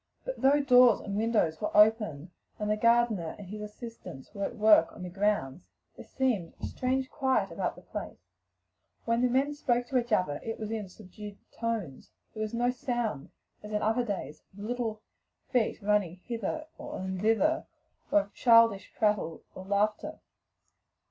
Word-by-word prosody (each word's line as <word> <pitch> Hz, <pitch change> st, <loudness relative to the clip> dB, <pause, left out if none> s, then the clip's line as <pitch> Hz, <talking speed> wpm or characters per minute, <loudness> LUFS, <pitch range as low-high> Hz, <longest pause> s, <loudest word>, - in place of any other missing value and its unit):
But -, -, -5 dB
though 275 Hz, +2 st, +5 dB
doors 250 Hz, -4 st, +6 dB
and 200 Hz, -1 st, -5 dB
windows 210 Hz, -7 st, +1 dB
were 210 Hz, -, 0 dB
open, 210 Hz, -7 st, +3 dB, 0.3 s
the 210 Hz, 0 st, 0 dB
gardener 230 Hz, -6 st, +2 dB
and 205 Hz, -, -9 dB
his 210 Hz, +1 st, -6 dB
assistants 210 Hz, -, -9 dB
at 200 Hz, 0 st, -3 dB
work 210 Hz, -6 st, +5 dB
in -, -, -8 dB
the 180 Hz, -, -6 dB
grounds, 190 Hz, -6 st, -1 dB, 0.3 s
there -, -, -10 dB
seemed 235 Hz, -10 st, -1 dB
a -, -, -4 dB
strange 260 Hz, +1 st, -1 dB
quiet 265 Hz, -2 st, +1 dB
about -, -, -2 dB
the -, -, -15 dB
place: -, -, -7 dB, 0.9 s
when 230 Hz, +1 st, +1 dB
the 250 Hz, -, +3 dB
men 270 Hz, +4 st, +1 dB
spoke 245 Hz, -4 st, 0 dB
to 260 Hz, -, +3 dB
each 240 Hz, 0 st, -6 dB
other 180 Hz, -8 st, +1 dB
it 225 Hz, 0 st, -4 dB
was 215 Hz, -1 st, -4 dB
in 215 Hz, -4 st, -4 dB
subdued 205 Hz, +1 st, -11 dB
tones; 220 Hz, -, -4 dB, 0.2 s
there 215 Hz, -, -6 dB
was 215 Hz, -1 st, -2 dB
no 245 Hz, +1 st, +2 dB
sound 240 Hz, -, -3 dB, 0.3 s
as 210 Hz, -, -9 dB
in 210 Hz, 0 st, -1 dB
other 225 Hz, +3 st, +2 dB
days 195 Hz, -8 st, -5 dB, 0.2 s
of 205 Hz, -, -8 dB
little 225 Hz, -2 st, -3 dB, 0.5 s
feet 245 Hz, -4 st, +1 dB
running 205 Hz, -4 st, +1 dB
hither 240 Hz, +6 st, -3 dB
and 190 Hz, -11 st, -5 dB
thither, 295 Hz, +10 st, +2 dB, 0.4 s
nor 205 Hz, -, +5 dB
of 200 Hz, +1 st, -14 dB
childish 230 Hz, -4 st, +4 dB
prattle 210 Hz, -7 st, 0 dB
or 185 Hz, -, -9 dB
laughter. 205 Hz, +2 st, 0 dB
215 Hz, 165 wpm, -29 LUFS, 200-240 Hz, 0.9 s, doors